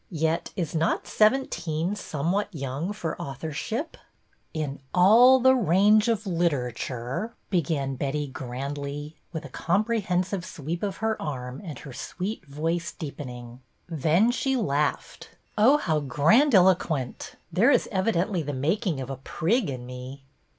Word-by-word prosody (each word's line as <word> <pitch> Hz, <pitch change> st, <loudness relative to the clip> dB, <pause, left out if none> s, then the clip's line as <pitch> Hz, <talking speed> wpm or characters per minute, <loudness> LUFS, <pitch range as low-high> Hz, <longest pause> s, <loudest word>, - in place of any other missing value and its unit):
Yet 160 Hz, +1 st, 0 dB
is 170 Hz, -6 st, -3 dB
not 165 Hz, +1 st, 0 dB
seventeen 185 Hz, -7 st, +1 dB
somewhat 175 Hz, +2 st, -1 dB
young 140 Hz, +3 st, -3 dB
for 210 Hz, -6 st, -4 dB
authorship? 160 Hz, -, -4 dB, 0.2 s
" -, -, -42 dB
' -, -, -43 dB
In 140 Hz, 0 st, -7 dB, 0.2 s
all 235 Hz, +8 st, +7 dB
the 260 Hz, +1 st, +6 dB
range 210 Hz, +1 st, +4 dB
of 225 Hz, -2 st, 0 dB
literature 145 Hz, -, -2 dB
— -, -, -43 dB
' -, -, -42 dB
" -, -, -43 dB
began 140 Hz, -6 st, 0 dB, 0.4 s
grandly, 140 Hz, +3 st, -5 dB, 0.2 s
with 160 Hz, -4 st, -5 dB
a -, -, -8 dB
comprehensive 190 Hz, -, 0 dB
sweep 165 Hz, 0 st, -5 dB
of 200 Hz, -2 st, -2 dB
her 220 Hz, -1 st, 0 dB
arm, 130 Hz, -3 st, -5 dB
and 160 Hz, -6 st, -7 dB
her 140 Hz, -, -10 dB
sweet 190 Hz, -, -5 dB
voice 165 Hz, +4 st, -2 dB
deepening. 125 Hz, -5 st, -8 dB, 0.3 s
Then 165 Hz, -, +2 dB
she 265 Hz, +2 st, 0 dB
laughed. 150 Hz, -, -1 dB
" -, -, -39 dB
Oh, 240 Hz, +7 st, +6 dB
how 160 Hz, -, 0 dB
grandiloquent! 165 Hz, -, +3 dB, 0.2 s
There 205 Hz, +9 st, +5 dB
is -, -, +3 dB
evidently 190 Hz, -2 st, +1 dB
the 145 Hz, -1 st, -4 dB
making 160 Hz, -, 0 dB
of 130 Hz, +1 st, -5 dB
a 135 Hz, -, -5 dB
prig 180 Hz, -, 0 dB
in 125 Hz, -2 st, -5 dB
me." 125 Hz, +2 st, -8 dB
165 Hz, 145 wpm, -26 LUFS, 140-205 Hz, 0.4 s, all